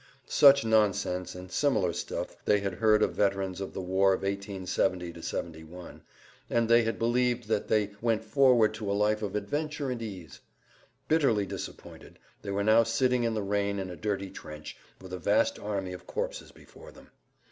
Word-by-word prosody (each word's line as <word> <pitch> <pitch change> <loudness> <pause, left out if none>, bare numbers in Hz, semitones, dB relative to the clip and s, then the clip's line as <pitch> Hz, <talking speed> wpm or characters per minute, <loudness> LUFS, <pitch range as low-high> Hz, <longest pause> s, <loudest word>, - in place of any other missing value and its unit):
Such 140 -2 +6
nonsense 100 -5 +1
and 90 0 -10
similar 115 - +1
stuff - - -5
they 105 - +3
had 100 -2 -2
heard 110 +2 +3
of - - 0
veterans 95 -2 0
of 95 - -5
the - - -3
war 95 +1 +3
of 95 - -8
1870 95 -3 -2
71, 85 +2 -7 0.5
and 115 -1 +1
they 115 +1 +6
had 115 0 -2
believed 120 0 +1
that 110 -2 0
they 105 -2 +1
went 115 -2 +1
forward 115 -1 +4
to 105 -2 -4
a 100 - 0
life 105 +1 +1
of 105 -2 -4
adventure 145 +6 -2
and 120 -2 -4
ease. 90 - -8 0.7
Bitterly 135 -10 +2
disappointed - - -9 0.2
they 100 - -7
were 100 +1 -1
now 110 +2 +6
sitting 120 +2 +1
in 115 -1 0
the 105 - -2
rain 100 0 -1
in 95 -2 -4
a - - -7
dirty 100 -1 -3
trench, 75 0 -9 0.2
with 95 -1 -11
a 90 - -4
vast 80 - +2
army 100 -3 -3
of 90 - -11
corpses - - -4
before - - -15
them. - - -18
105 Hz, 180 wpm, -29 LUFS, 95-115 Hz, 0.7 s, Such